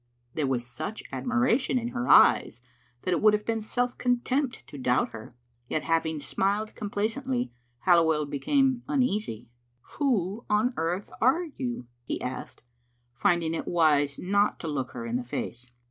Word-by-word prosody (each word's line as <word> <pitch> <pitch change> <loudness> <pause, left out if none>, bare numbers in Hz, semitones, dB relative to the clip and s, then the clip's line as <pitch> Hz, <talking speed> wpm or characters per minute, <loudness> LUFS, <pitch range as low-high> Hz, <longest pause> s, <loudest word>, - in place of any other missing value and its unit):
There 150 -3 0
was 125 -2 -1
such 125 - -6
admiration 255 +1 +1
in 240 -1 -2
her 245 0 -3
eyes 115 - +6 0.4
that 185 - -1
it 175 - +1
would 215 0 +6
have 210 0 0
been 225 -1 -1
self 245 +3 -1
contempt 250 +2 0
to 145 - -10
doubt 125 -1 +2
her. 115 +1 -10 0.3
Yet 155 - -1
having 160 -1 0
smiled 200 +9 -1
complacently, 230 +5 -2 0.3
Halliwell 160 -4 +4
became 255 - +1
uneasy. 215 - -1 0.5
"Who 225 - 0
on 215 +4 +2
earth 175 +5 -2
are 265 +9 +4
you?" 255 - -5 0.2
he - - -3
asked, 125 -1 -6 0.5
finding 170 +4 +1
it 165 - -4
wise 150 -4 +3
not 200 +2 +1
to 165 - -4
look 135 -4 -2
her 120 -2 -5
in 115 +1 -1
the 125 - -4
face. 120 0 -5
200 Hz, 155 wpm, -27 LUFS, 145-245 Hz, 0.5 s, eyes